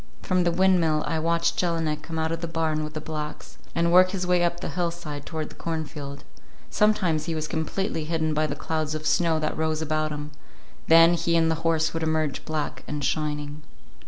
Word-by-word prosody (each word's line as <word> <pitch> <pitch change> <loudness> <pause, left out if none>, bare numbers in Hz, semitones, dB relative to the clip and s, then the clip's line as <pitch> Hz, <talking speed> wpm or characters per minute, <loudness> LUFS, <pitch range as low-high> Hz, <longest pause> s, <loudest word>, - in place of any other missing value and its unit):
From 185 -1 +1
the 170 - +3
windmill 170 -4 +3
I 160 - -1
watched 170 +1 +1
Jelinek 165 -3 0
come 160 +1 -6
out 160 0 0
of 165 0 -3
the 170 - -2
barn 160 -2 -1
with 155 +1 -6
the - - -2
blacks, 150 -1 -6 0.2
and 170 0 +2
work 185 +1 +7
his 185 -1 -2
way 180 -1 +3
up 175 0 0
the - - -4
hillside 170 -5 -4
toward 160 -2 -4
the - - -14
cornfield. 150 -3 -5 0.5
Sometimes 185 -8 +2
he 165 -1 -2
was 155 0 -2
completely 160 +1 -2
hidden 160 -1 0
by 155 +1 +1
the 145 - -3
clouds 155 0 -2
of 155 0 -5
snow 165 0 +3
that 155 - -1
rose 155 0 0
about 155 0 0
him; 150 0 -5 0.6
then 165 +1 +7
he 170 0 +1
and 165 0 +3
the 160 0 -2
horses 165 -1 +1
would 165 - -2
emerge 155 -2 -1
black 155 -2 -3
and 150 -2 -3
shining. 150 0 -2
160 Hz, 205 wpm, -25 LUFS, 155-170 Hz, 0.6 s, work